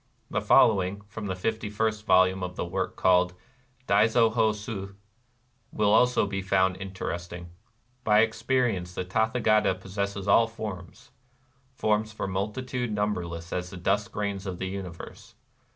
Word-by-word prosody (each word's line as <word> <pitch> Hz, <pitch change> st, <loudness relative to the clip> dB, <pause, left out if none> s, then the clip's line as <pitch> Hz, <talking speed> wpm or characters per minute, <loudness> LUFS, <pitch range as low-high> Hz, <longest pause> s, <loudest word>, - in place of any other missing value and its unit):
The -, -, 0 dB
following", 100 Hz, -4 st, +4 dB
from 105 Hz, +1 st, -7 dB
the 95 Hz, -, -2 dB
fifty 110 Hz, +3 st, -2 dB
first 110 Hz, +1 st, -2 dB
vol 95 Hz, 0 st, +6 dB
ume 95 Hz, +1 st, -5 dB
of 90 Hz, 0 st, -4 dB
the -, -, -3 dB
work -, -, -3 dB
called 90 Hz, 0 st, +3 dB, 0.5 s
Daizo 110 Hz, +2 st, +4 dB
ho 110 Hz, -1 st, +3 dB
su 105 Hz, -2 st, -6 dB, 0.8 s
will 105 Hz, -1 st, +2 dB
also 125 Hz, 0 st, +4 dB
be 95 Hz, -1 st, -3 dB
found 95 Hz, -1 st, +2 dB
inter 95 Hz, 0 st, -5 dB
esting: 85 Hz, 0 st, -7 dB, 0.2 s
— 110 Hz, 0 st, -41 dB
" 125 Hz, +1 st, -40 dB
By 105 Hz, 0 st, +5 dB
experience 115 Hz, -5 st, 0 dB
the 90 Hz, -, -3 dB
Tathagata 110 Hz, 0 st, +2 dB
possesses 100 Hz, +1 st, -4 dB
all 115 Hz, +3 st, +5 dB
forms, 110 Hz, +2 st, -8 dB, 0.3 s
— 130 Hz, 0 st, -38 dB
forms 110 Hz, 0 st, +1 dB
for 110 Hz, -, -4 dB
multitude 110 Hz, +5 st, -3 dB
numberless 90 Hz, -5 st, -3 dB
as 90 Hz, 0 st, -3 dB
the 95 Hz, -, -9 dB
dust 100 Hz, +4 st, 0 dB
grains 100 Hz, -1 st, -3 dB
of 90 Hz, -1 st, -4 dB
the 95 Hz, -, -4 dB
universe. 95 Hz, +3 st, -8 dB
100 Hz, 160 wpm, -27 LUFS, 95-110 Hz, 0.8 s, vol